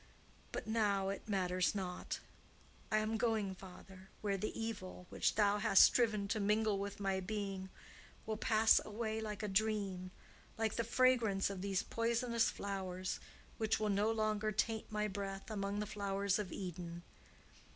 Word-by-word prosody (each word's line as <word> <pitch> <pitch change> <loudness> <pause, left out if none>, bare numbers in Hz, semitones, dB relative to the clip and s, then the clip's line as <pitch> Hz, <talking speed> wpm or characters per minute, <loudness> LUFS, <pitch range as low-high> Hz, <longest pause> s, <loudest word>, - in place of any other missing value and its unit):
"But - - -4
now 205 -3 +1
it 200 +2 -5
matters 185 -1 +1
not. 185 -2 -3 0.7
I 215 - +4
am 215 +1 0
going, 220 -4 +1
father, 190 0 -12
where 200 -2 0
the 210 +4 -3
evil 205 -5 -5
which - - +1
thou 205 -1 +3
hast 210 -2 +7
striven 215 -4 +4
to 215 - 0
mingle 210 0 +2
with 200 0 -4
my 195 -1 0
being 195 -1 -3 0.6
will 220 - -2
pass 220 0 +5
away 220 +1 -3
like 215 -1 -4
a - - 0
dream 195 -3 0 0.5
like 220 -1 0
the 230 - +1
fragrance 230 -5 +3
of 190 -2 -5
these 195 -1 0
poisonous 235 0 +1
flowers, 185 -2 -3 0.4
which 220 -1 +1
will 215 -1 0
no 205 +2 +2
longer 215 -1 0
taint 220 +2 -1
my 210 0 0
breath 195 +2 -5
among 200 -1 -2
the 210 - -1
flowers 200 -1 0
of 205 -3 -3
Eden. 175 -2 -6
205 Hz, 155 wpm, -36 LUFS, 195-220 Hz, 0.7 s, hast